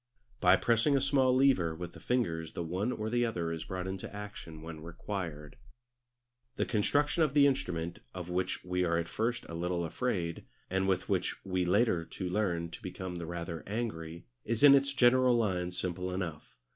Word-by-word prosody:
By - - +6
pressing 120 +5 +3
a - - +3
small 135 -1 +3
lever 130 -12 +3
with 85 +1 -7
the - - -11
fingers 85 -11 -1
the 85 - -3
one 95 +8 -1
or 110 -2 -3
the 120 0 +2
other 85 -8 -1
is 80 -1 -4
brought 95 -1 -4
into 95 0 -5
action 100 -6 -8
when 80 -1 -7
required. 85 -3 -6 1.0
The - - 0
construction 145 +9 +1
of 150 -3 +2
the 145 -1 +7
instrument, 85 -12 -1
of 90 -2 -6
which 90 +1 -2
we 90 0 0
are 85 -1 +2
at 85 0 -1
first 120 +5 -1
a - - -8
little 85 +1 -1
afraid, 85 -4 -2 0.3
and 95 0 +1
with 95 -1 +1
which 95 -1 -1
we 95 -2 0
later 90 -3 +2
on 95 - -1
learn 90 -4 0
to - - -9
become 90 -2 -5
rather 85 -1 -5
angry, 85 -7 -4 0.2
is 115 +3 -1
in 145 -1 +10
its 140 0 +4
general 130 -1 +5
lines 90 -5 -1
simple 90 0 -2
enough. 90 -5 -5
95 Hz, 185 wpm, -31 LUFS, 85-120 Hz, 1.0 s, in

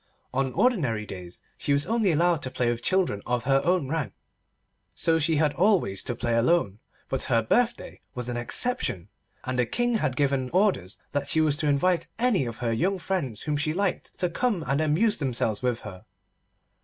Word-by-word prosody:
On 135 0 0
ordinary 140 - +1
days 90 -3 -9 0.2
she 145 - +1
was 140 0 +2
only 220 -4 +2
allowed 170 0 +2
to 130 - -4
play 125 -2 0
with 120 0 -4
children 185 - +1
of 120 -1 0
her 135 +2 +3
own 175 -5 +1
rank, 145 -8 -2 0.8
so 165 0 +2
she 160 +1 +2
had 150 -1 +2
always 175 - +2
to 120 - -3
play 120 0 -1
alone, 115 - +2 0.3
but 135 - -1
her 115 -3 +2
birthday 240 - 0
was 125 -1 -4
an 120 - -3
exception, 120 - 0 0.3
and 130 -1 -2
the 125 - +3
King 240 - 0
had 130 -8 -1
given 135 -2 0
orders 185 - +1
that 145 - -2
she 160 - +1
was 155 -2 +3
to 155 -1 -1
invite 165 +5 +2
any 225 - +2
of 115 - -6
her 115 -1 -1
young 190 +12 0
friends 170 - -3
whom 150 -1 -1
she 155 +2 -1
liked 200 -1 -2
to 180 - 0
come 190 +1 -1
and 135 +4 0
amuse 165 +9 +2
themselves 120 -6 -1
with 125 -2 -1
her. 95 -4 -10
145 Hz, 190 wpm, -26 LUFS, 120-180 Hz, 0.8 s, her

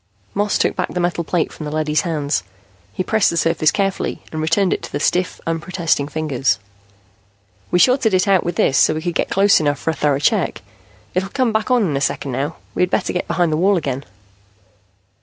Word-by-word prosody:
Moss 205 +1 +1
took - - +1
back - - -2
the 180 - -3
metal 175 -1 0
plate 170 0 -1
from 155 - -7
the - - -5
leady's 155 -1 +1
hands. 150 - -1 0.5
He 185 - -3
pressed 215 +2 +2
the 170 - -2
surface 165 -1 +2
carefully 195 -2 -2
and 155 - -3
returned 175 +4 +2
it - - -3
to - - -8
the 145 - -2
stiff, 180 +4 0
unprotesting 165 -2 -1
fingers. 145 -4 0 1.1
"We - - +2
shorted 245 0 +4
it 185 +2 +2
out 195 -3 +4
with 175 0 -3
this, 135 - +3
so - - +4
we 155 - -4
could 175 -1 -2
get - - -1
close 200 +1 +4
enough 145 -2 0
for 160 - -1
a - - -4
thorough 145 -1 +1
check. 145 - 0 0.5
It'll 190 +2 -1
come 250 0 0
back 220 +2 0
on 250 -3 +3
in 160 -7 0
a 135 - -1
second 140 -1 -1
now. 140 +5 -2 0.2
We - - -2
had 180 - +3
better - - 0
get 180 - -2
behind 170 -1 +1
the 155 - +1
wall 190 +3 +3
again." 140 -4 -3
165 Hz, 215 wpm, -19 LUFS, 150-190 Hz, 1.1 s, shorted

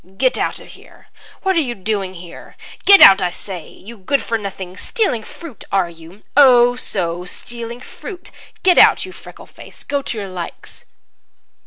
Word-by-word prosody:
"Get 255 +2 +2
out - - -2
of - - -15
here! - - -18 0.3
What 380 -1 +1
are - - +3
you 245 -5 -4
doing 195 -1 -3
here? 175 0 -12 0.3
Get 395 0 +8
out, 195 0 +9
I 180 - +1
say, 180 -1 -9
you 230 +4 -13
good 250 +7 -1
for 230 - -2
nothing! 195 -4 -6
Stealing 400 - -1
fruit, 300 - -11
are 190 -3 +1
you? 165 +5 -15
Oh, 245 -3 +6
so, 175 -7 -3
stealing 235 +5 -7
fruit! 360 - -10 0.3
Get 365 -1 +5
out, - - +5
you 375 - -10
freckle - - -13
face, - - -11
go 285 -1 -2
to 240 - -6
your 200 -2 -5
likes!" 180 -2 -9
220 Hz, 175 wpm, -18 LUFS, 185-265 Hz, 0.3 s, out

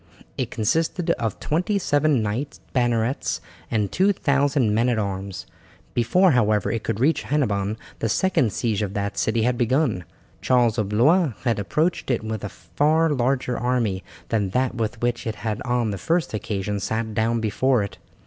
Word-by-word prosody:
It - - -2
consisted 165 - 0
of 115 - -2
twenty 180 +7 0
seven 145 - +2
knights 115 +8 -3
bannerets 120 0 0 0.3
and 105 -3 0
2000 140 - +2
men 115 +3 +2
at 120 - +1
arms. 95 -2 -3 0.5
Before, 180 - +4
however, 110 -5 +2
it 115 - -2
could 100 - -2
reach 150 +6 +2
Hennebon 105 -8 0 0.2
the 115 - -1
second 130 - +2
siege 110 0 -1
of 100 -1 -3
that 100 0 -2
city 110 0 +1
had 120 +1 +1
begun. 125 - +1 0.4
Charles 120 -3 +3
of 100 -2 -1
Blois 145 - +3
had 115 -3 +1
approached 150 - 0
it 120 -4 0
with 110 -1 -4
a 105 - -3
far 155 +7 +1
larger 125 -1 0
army 115 -6 0 0.3
than 105 -4 0
that 130 +6 0
with 115 0 -3
which 120 -1 0
he - - -3
had 105 0 -3
on 120 -3 0
the 100 - -4
first 165 -4 0
occasion 105 -1 -2
sat 110 +2 -2
down 115 +2 +1
before 115 +2 +1
it. 100 - -7
115 Hz, 170 wpm, -23 LUFS, 105-140 Hz, 0.5 s, Before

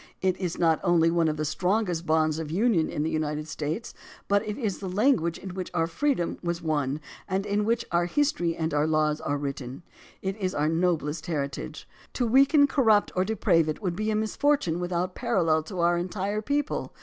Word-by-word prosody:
It 185 -1 +1
is 180 -3 -3
not 165 -2 +3
only 170 -2 +4
one 170 -1 +2
of 155 -1 -1
the 155 - -1
strongest 180 +1 0
bonds 155 0 +2
of 160 -2 -4
union 190 -1 +2
in 150 - -2
the 160 - 0
United 155 -1 -2
States, 160 +7 -4 0.3
but 200 0 +3
it 210 - -3
is 215 -8 -2
the 190 - -5
language 185 - +2
in 190 -1 -8
which 185 -1 -5
our 165 -1 +2
freedom 175 - -1
was 170 -1 -2
won 150 -3 -1 0.3
and 195 +1 -1
in 205 0 0
which 230 +1 0
our 175 0 +2
history 275 - 0
and 160 -1 -2
our 150 +1 +2
laws 155 -1 +1
are 145 - -1
written. 140 0 -5 0.4
It 190 0 -2
is 185 -3 -2
our 150 +1 +1
noblest 165 -2 0
heritage. 140 -4 -4 0.3
To 245 - 0
weaken, 275 +5 +5
corrupt, 230 -7 +3
or 185 - +2
deprave 180 -6 +2
it 155 - -4
would 180 -3 -1
be 215 +3 -1
a 215 - +1
misfortune 215 - +1
without 180 +1 -2
parallel 175 -10 +1
to 180 0 -4
our 170 0 +3
entire 195 +4 -2
people. 285 +5 -2
175 Hz, 200 wpm, -27 LUFS, 160-210 Hz, 0.4 s, weaken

